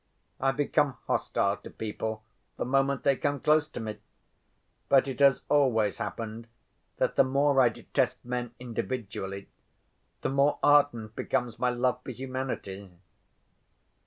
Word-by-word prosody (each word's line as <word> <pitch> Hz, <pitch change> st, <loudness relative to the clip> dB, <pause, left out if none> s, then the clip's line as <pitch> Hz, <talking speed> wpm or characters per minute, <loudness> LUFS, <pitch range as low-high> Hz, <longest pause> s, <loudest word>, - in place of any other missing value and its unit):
I 135 Hz, 0 st, +2 dB
become 145 Hz, -1 st, +1 dB
hostile 100 Hz, +1 st, 0 dB
to -, -, -11 dB
people 110 Hz, 0 st, -4 dB, 0.3 s
the -, -, -2 dB
moment 135 Hz, +1 st, +1 dB
they 140 Hz, -1 st, +4 dB
come 145 Hz, +2 st, -1 dB
close 155 Hz, +2 st, +3 dB
to -, -, -8 dB
me. 110 Hz, -2 st, -5 dB, 0.9 s
But 135 Hz, 0 st, +5 dB
it 135 Hz, -1 st, -5 dB
has 140 Hz, -2 st, +5 dB
always 120 Hz, -8 st, +2 dB
happened 115 Hz, 0 st, -5 dB, 0.5 s
that -, -, 0 dB
the -, -, +7 dB
more 135 Hz, +1 st, +3 dB
I 125 Hz, -, +6 dB
detest 115 Hz, -, -2 dB
men 120 Hz, -1 st, -4 dB
individually 100 Hz, -5 st, -4 dB, 0.7 s
the -, -, -1 dB
more 140 Hz, +2 st, +2 dB
ardent 130 Hz, -7 st, +3 dB
becomes 120 Hz, -2 st, -2 dB
my 125 Hz, -, +2 dB
love 125 Hz, 0 st, 0 dB
for -, -, -8 dB
humanity. 130 Hz, -7 st, -5 dB
125 Hz, 135 wpm, -28 LUFS, 110-140 Hz, 0.9 s, the